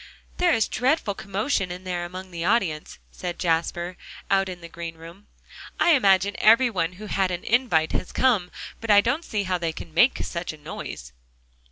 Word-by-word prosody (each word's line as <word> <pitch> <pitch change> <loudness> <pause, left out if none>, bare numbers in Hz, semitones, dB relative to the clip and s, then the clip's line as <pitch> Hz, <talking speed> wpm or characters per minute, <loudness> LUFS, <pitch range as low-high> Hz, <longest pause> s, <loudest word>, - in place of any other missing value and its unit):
"There 355 -1 +3
is 225 -8 +3
a - - -11
dreadful 250 -3 +1
commotion 195 0 -2
in 180 +1 -7
there 175 -2 -3
among 185 +1 -8
the 170 -1 -4
audience," 180 -7 0
said 175 -1 -5
Jasper, 175 +1 -1 0.3
out 195 -1 +3
in 180 -1 -7
the 170 - -8
green 170 -1 -7
room; 170 +5 -13 0.5
"I 345 - +5
imagine 200 - +4
every 230 +3 +5
one 180 -4 -1
who 205 +4 -10
had 195 -2 0
an 175 -1 -4
'invite,' 225 -10 +2
has - - -3
come. 220 -9 +2 0.3
But 230 - -7
I 205 -1 +8
don't 260 +10 0
see 210 -9 -2
how 185 -1 -1
they 165 -1 -1
can 160 0 -10
make 235 +11 +4
such 170 -1 -4
a - - -12
noise." - - -8
185 Hz, 195 wpm, -25 LUFS, 170-215 Hz, 0.5 s, I